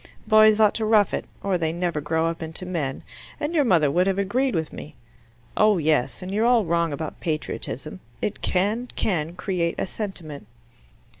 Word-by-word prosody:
Boys 215 0 +6
ought 215 -2 +5
to 225 - -2
rough 215 -2 +3
it, - - -2 0.2
or 190 -3 0
they 160 -1 0
never 170 -2 -2
grow 160 +2 0
up 165 0 -2
into 160 +3 -4
men, 160 -7 -3 0.4
and 295 +3 -2
your 305 -4 +3
mother 165 - +3
would 180 +5 +2
have 195 0 +1
agreed 240 +6 0
with 160 -2 -2
me. 150 - -9 0.6
Oh 215 -2 +4
yes; 155 -1 0
and 185 - -6
you're 215 +4 +2
all 240 -4 +4
wrong 170 -1 +1
about 150 +2 -5
patriotism. 155 - -4 0.2
It 210 - -3
can, 210 +7 0
can, 165 -4 -1
create 180 -2 -1
a - - -1
sentiment." 170 - -6
180 Hz, 180 wpm, -24 LUFS, 160-210 Hz, 0.6 s, Boys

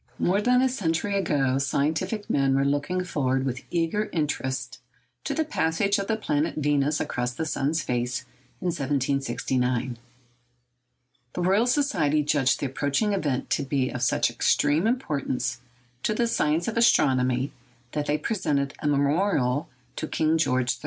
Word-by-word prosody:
_ - - -44 0.2
More 195 +3 +2
than 250 +3 +3
a - - +4
century 200 -5 -1
ago 135 -8 +1
scientific 155 - -1
men 135 -1 +2
were 135 0 +2
looking 145 +6 0
forward 135 -6 0
with 130 0 -3
eager 175 +5 0
interest 130 -5 -2 0.5
to - - -1
the 320 - +1
passage 200 - +1
of 200 - -3
the 225 - +1
planet 150 -7 -1
Venus 145 0 +1
across 125 0 -2
the 160 - -2
sun's 155 +1 -1
face 125 -1 -1 0.4
in 180 - 0
1769. 130 -4 -1 1.3
The - - -3
Royal 200 +6 +3
Society 170 - +2
judged 145 -3 +2
the - - 0
approaching 145 - 0
event 145 -9 -1
to - - +2
be 135 -1 0
of 125 - -5
such 125 - +2
extreme 155 +8 +2
importance 140 - -1 0.4
to 215 - 0
the 235 - +2
science 160 -7 +1
of 230 - -2
astronomy 130 - +3 0.4
that 150 -1 -2
they 150 - +2
presented 145 -9 -1
a 150 - -2
memorial 145 -1 +1 0.3
to - - -3
King 155 0 +1
George 125 -4 +1
III. - - -21
145 Hz, 155 wpm, -26 LUFS, 130-180 Hz, 1.3 s, a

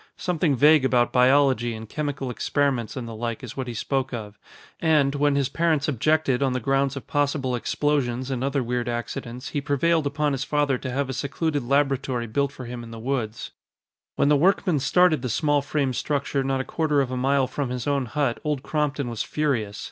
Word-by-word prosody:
Something 165 -5 0
vague 150 +2 +5
about 125 -2 +2
biology 125 -2 +3
and 110 0 -8
chemical 140 -1 -3
experiments 130 -3 -1
and 120 -2 -4
the 115 - -7
like 115 +1 -4
is 125 -1 -7
what 130 -2 -4
he 120 - -5
spoke 135 +3 -1
of, 105 -2 -8 0.4
and, 150 -4 +3
when 145 0 +2
his 140 -2 +2
parents 155 0 +1
objected 150 -1 +1
on 135 -2 +2
the 130 - -1
grounds 135 +2 +1
of 135 - -7
possible 140 -3 0
explosions 130 0 -1
and 130 -1 -2
other 140 -1 0
weird 120 0 -2
accidents, 120 +1 -5
he 145 - -2
prevailed 150 +2 +1
upon 150 +1 0
his 135 -1 -1
father 145 -3 +1
to 130 - -5
have 135 +2 -1
a 130 - -4
secluded 145 +3 -1
laboratory 135 -2 0
built 140 +5 0
for 130 - -9
him 120 0 -6
in 115 - -10
the 115 - -8
woods. 115 -2 -3 0.6
When - - +2
the 150 - +5
workmen 180 0 +2
started 160 +2 +3
the 125 - -3
small 145 +4 +2
frame 140 -2 -1
structure 140 +1 -1
not 135 0 0
a - - -3
quarter 150 -2 0
of 135 -2 0
a - - -2
mile 135 +1 +2
from 135 0 -3
his 125 -1 -4
own 140 -3 0
hut, 130 0 -1
Old 150 -3 -2
Crompton 150 -3 -1
was 115 -2 -3
furious. 115 -9 -1
135 Hz, 205 wpm, -24 LUFS, 125-145 Hz, 0.6 s, vague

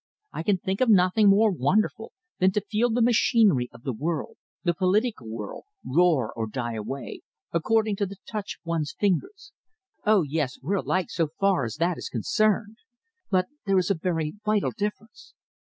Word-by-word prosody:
I - - -3
can 195 +3 +2
think 190 +4 -3
of 255 - +3
nothing 200 +1 +5
more 210 +2 +5
wonderful 200 - 0 0.3
than 185 +1 +4
to 210 - -1
feel 230 +3 +2
the 235 +1 +2
machinery 215 - +3
of 120 - -16
the 130 - -2
world 155 +6 -3 0.3
the 175 -2 +2
political 190 - 0
world 110 -2 -7 0.2
roar 155 -6 +2
or 110 -1 -3
die 120 +1 -4
away, 115 +4 -6 0.3
according 215 +4 +1
to 200 - 0
the 200 - -9
touch 210 -2 -4
of - - -57
one's 165 -3 -2
fingers. 385 - -1 0.5
Oh, 215 -4 +4
yes, 145 -3 -2
we're 185 +10 -1
alike 185 -1 -1
so 165 -2 0
far 195 -9 +2
as 110 - -5
that 170 +2 0
is - - -5
concerned! 210 - 0 0.5
But 185 -2 +2 0.2
there 195 -1 +3
is 185 +2 +2
a - - +5
very 165 -3 -2
vital 210 -1 +1
difference. 210 +1 -6
185 Hz, 175 wpm, -26 LUFS, 150-210 Hz, 0.5 s, nothing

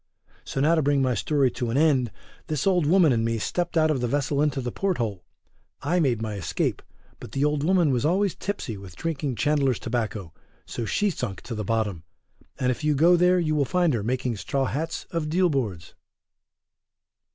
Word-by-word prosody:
So - - -4
now 155 +4 +4
to 165 - +3
bring 140 -1 +2
my 130 -1 +2
story 135 +3 +1
to 120 0 -3
an 120 - 0
end 140 -6 +3 0.4
this 155 -3 -2
Old 180 -6 +3
Woman 170 -4 +5
and 115 -1 +1
me 115 0 0
stepped 175 +9 -2
out 155 -1 +4
of 135 -5 -1
the 120 - 0
vessel 145 +2 0
into 150 -2 +1
the 125 -2 -3
port 195 -2 -1
hole; 105 - -3 0.6
I 170 +6 +1
made 125 -8 +1
my 110 -1 -3
escape, 100 -5 -2 0.4
but - - -10
the 140 +1 +1
Old 150 -1 0
Woman 175 -3 +3
was 125 -3 0
always 190 +4 +2
tipsy 190 - -4
with 95 -2 -11
drinking 150 -5 -3
Chandler's 140 -3 +1
tobacco, 110 -7 -3 0.3
so 115 - -4
she 205 - +1
sunk 100 - -5
to 120 - -7
the 105 -1 -3
bottom, 105 -5 -1 0.6
and 125 0 +1
if 130 - -5
you 150 -1 +2
go 170 +5 +5
there 180 +1 +4
you 160 -3 +1
will 150 -2 +2
find 175 +3 +1
her 115 - 0
making 125 +1 -1
straw 135 +6 -1
hats 160 +5 -3
of 165 -3 -2
deal 180 +2 +2
boards. 105 - -3
140 Hz, 205 wpm, -25 LUFS, 115-160 Hz, 0.6 s, Woman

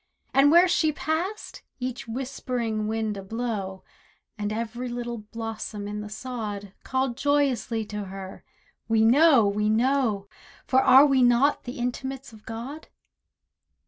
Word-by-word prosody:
And 275 +1 +6
where 345 +3 +7
she 320 -3 +2
passed, 335 +8 -3 0.2
each 250 -1 -4
whispering 235 -3 -3
wind 220 -1 -2
ablow, 195 -2 -4 0.5
And 210 -1 -3
every 235 +3 -4
little 240 -1 -4
blossom 215 -1 -6
in 210 0 -4
the 210 - -7
sod, 210 -4 -6
Called 260 -2 -1
joyously 270 -5 +1
to 210 -1 -5
her, 190 0 -9 0.4
"We 225 -1 +3
know, 265 0 +6
we 210 +1 +1
know, 225 -3 +1 0.4
For 260 0 +3
are 265 +2 +8
we 270 -3 +3
not 245 +4 +3
the 245 - -6
intimates 255 +1 -4
of 215 -1 -16
God?" 245 +8 -7
235 Hz, 135 wpm, -26 LUFS, 215-265 Hz, 0.5 s, are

